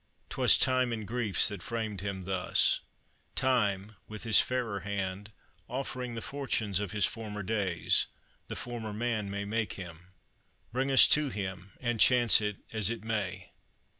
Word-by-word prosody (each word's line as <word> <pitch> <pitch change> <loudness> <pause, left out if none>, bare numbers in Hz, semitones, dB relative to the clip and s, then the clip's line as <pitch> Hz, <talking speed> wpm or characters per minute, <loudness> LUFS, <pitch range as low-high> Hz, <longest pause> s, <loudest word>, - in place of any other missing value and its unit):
'Twas - - +4
time 130 -1 +2
and 110 -3 -4
griefs 115 -4 +3
That 100 -3 -5
framed 110 -3 -4
him 100 -2 -4
thus: 95 0 +2 0.5
Time, 105 -5 0
with 110 0 -7
his 110 -2 +6
fairer 120 -6 -2
hand, 100 +1 -4 0.4
Offering 125 -1 -4
the 115 - -5
fortunes 110 -8 -1
of 105 -3 -4
his 105 -3 +2
former 105 -2 -5
days, 95 -4 +1 0.4
The - - -6
former 115 -3 -5
man 110 -2 -2
may 100 0 -4
make 110 +1 -2
him. 90 -2 -10 0.7
Bring 130 +2 0
us 135 - +9
to 150 -2 +3
him, 95 -3 -6
And 120 -2 -2
chance 120 -2 +6
it 105 -1 -2 0.2
as 110 -3 +1
it 120 -2 -4
may. 105 -5 -3
105 Hz, 155 wpm, -30 LUFS, 100-120 Hz, 0.7 s, us